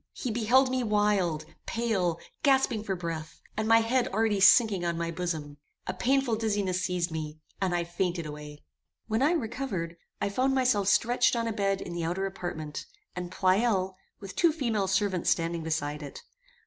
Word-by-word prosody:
He 250 - -3
beheld 245 +4 +3
me 260 0 +1
wild, 205 -7 +1 0.2
pale, 200 -8 0 0.2
gasping 265 -6 +3
for 195 -3 -2
breath, 165 -3 -5 0.2
and 215 0 -1
my 225 0 +6
head 245 +2 +1
already 215 0 +1
sinking 200 -2 +6
on 170 -1 -1
my 170 0 -2
bosom. 160 -4 -4 0.3
A - - -3
painful 265 -3 +1
dizziness 205 -4 0
seized 180 -2 -1
me, 155 -1 -5 0.2
and 185 -2 +1
I 175 - +1
fainted 175 0 -2
away. 150 0 -9 0.4
When 220 +2 0
I 300 +5 +4
recovered, 220 - -3 0.2
I - - 0
found 260 +6 +1
myself 245 -7 +2
stretched 240 +4 +3
on 230 -1 -1
a 225 - -1
bed 195 -2 0
in 175 - -6
the 170 -1 -3
outer 180 +4 -1
apartment, 165 -6 -5 0.3
and 180 0 -5
Pleyel, 190 0 +2 0.2
with 195 -2 -9
two 340 -2 +4
female 230 -10 -1
servants 195 -2 +1
standing 170 0 0
beside 150 -2 -2
it. 145 -2 -9
195 Hz, 175 wpm, -28 LUFS, 170-225 Hz, 0.4 s, my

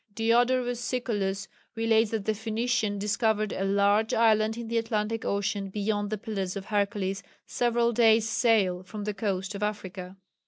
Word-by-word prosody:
Diodorus 245 +2 +2
Siculus 205 -6 -2 0.3
relates 225 -1 +2
that 215 -3 -3
the 220 - +1
Phoenicians 220 0 -1
discovered 210 +1 0
"a 195 - -2
large 200 +2 +2
island 220 -1 +3
in 235 -1 -6
the 230 0 +1
Atlantic 225 0 -2
Ocean 200 0 -1
beyond 205 +1 -1
the 215 - -2
Pillars 195 -3 -4
of 195 -1 -5
Hercules 200 -2 -1 0.2
several 235 -1 +1
days' 225 -1 +4
sail 205 -7 +2
from 205 +3 -7
the 210 0 -2
coast 195 -2 -2
of 200 - -6
Africa." 190 -3 -4
215 Hz, 155 wpm, -27 LUFS, 200-225 Hz, 0.3 s, days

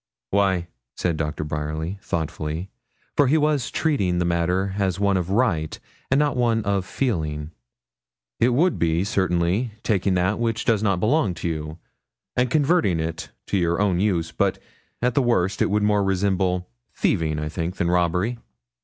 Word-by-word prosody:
'Why,' 95 -3 +2 0.3
said 85 -3 0
Doctor 75 -1 -3
Bryerly 75 +5 -3
thoughtfully, 80 +1 -3 0.4
for 145 - +4
he 150 +5 +4
was 150 -4 +1
treating 100 - 0
the 90 - +1
matter 90 +3 0
as 95 -2 0
one 100 -1 +2
of 90 -1 -1
right, 95 -8 +1 0.3
and 130 - +3
not 145 -1 +2 0.3
of 100 -2 0
feeling, 80 - -2 0.9
'it 120 - +4
would 160 +9 +2
be, 85 +1 +2
certainly, 95 +3 0
taking 95 -3 +1
that 90 +4 +1
which 115 -1 -1
does 110 -3 +2
not 100 -4 +1
belong 110 - +2
to - - -4
you, 80 -1 -4 0.6
and 125 0 +2
converting 145 - +2
it 80 +1 -4 0.2
to 100 - 0
your 85 0 +1
own 100 -4 +2
use; 90 -5 0
but, - - 0 0.5
at 125 0 +2
the 140 - +3
worst, 100 -6 +1
it - - +3
would 105 +1 +1
more 105 -1 +3
resemble 95 -2 0 0.3
thieving, 80 -5 +1
I 75 0 -2
think, 85 +3 -3
than 85 0 0
robbery.' 90 +7 +1
95 Hz, 160 wpm, -23 LUFS, 85-110 Hz, 0.9 s, for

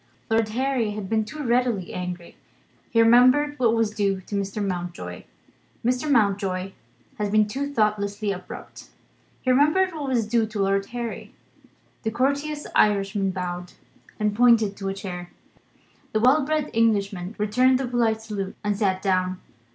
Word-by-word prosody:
Lord 225 -1 +2
Harry 245 -2 0
had 205 -2 -5
been 220 -1 +2
too 300 +6 -7
readily 240 -6 0
angry: 180 -1 -6 0.5
he 230 - +1
remembered 255 +6 +5
what 230 -2 +3
was 225 -2 +1
due 200 -2 0
to 195 - -12
Mr. 200 +1 -2
Mountjoy. 175 - -5 0.6
Mr. 255 +5 0
Mountjoy 195 -6 +1 0.5
had 205 -1 -1
been 215 0 +4
too 275 +6 -3
thoughtlessly 210 -3 0
abrupt: 180 -1 -9 0.5
he 255 - +2
remembered 305 +8 +3
what 300 -3 -4
was 245 -4 +1
due 225 0 +1
to 215 -1 -6
Lord 195 0 +1
Harry. 235 -1 -6 0.7
The 220 - -1
courteous 280 +5 -1
Irishman 200 -1 +2
bowed, 180 -1 -5 0.5
and 210 -1 0
pointed 230 -3 +4
to 195 -1 -3
a - - -2
chair. 180 -3 -6 0.8
The 215 - +2
well 260 +6 +4
bred 305 0 -1
Englishman 200 -4 +1
returned 250 +5 +3
the 270 - -1
polite 230 -2 0
salute, 200 -3 -5
and 205 0 0
sat 190 -2 0
down. 185 -1 0
215 Hz, 150 wpm, -24 LUFS, 195-245 Hz, 0.8 s, remembered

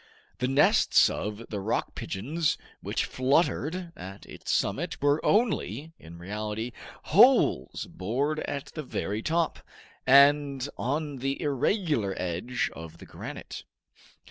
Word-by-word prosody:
The 125 - +1
nests 135 +3 +5
of 105 +3 -4
the 105 - -3
rock 95 - -1
pigeons 145 - -1 0.2
which - - -1
fluttered 165 +5 0
at 95 +1 -9
its - - -10
summit - - 0
were 145 +2 +2
only, 160 - +1
in 85 +1 -12
reality, 105 +5 -4 0.3
holes 65 - +4
bored 135 - -2
at 140 -3 -4
the 155 - -4
very 110 -6 -3
top, 165 +5 0 0.5
and 140 0 +5
on 145 +2 -2
the 135 +2 -2
irregular 145 - 0
edge 90 +8 -2
of 80 0 -10
the - - -12
granite. - - -8
135 Hz, 120 wpm, -28 LUFS, 105-150 Hz, 0.5 s, nests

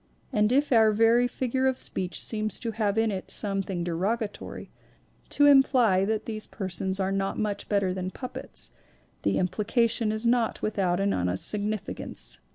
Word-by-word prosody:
And 210 +1 +3
if 280 +3 +2
our 220 -3 +6
very 230 +3 +4
figure 260 +1 -1
of 260 -1 +1
speech 185 -1 -3
seems 215 -1 -2
to 230 - -2
have 215 -1 -1
in 225 -1 +2
it 190 -2 -5
some 195 -2 -1
thing 185 -3 -3
derogatory, 200 +6 -3 0.6
to 290 - +4
imply 255 -9 +5
that 215 +1 -1
these 215 -1 -5
persons 190 -1 -3
are 190 0 0
not 195 0 -1
much 210 -2 -2
better 200 -3 +1
than 185 0 -3
puppets, 245 - -4 0.5
the 100 - +1
implication 215 +4 +1
is 220 +2 -3
not 235 -1 +2
with 215 -1 -2
out 180 -1 +1
an 200 0 +1
honest 90 +1 -1
significance. 210 -1 -2
210 Hz, 165 wpm, -27 LUFS, 190-230 Hz, 0.6 s, our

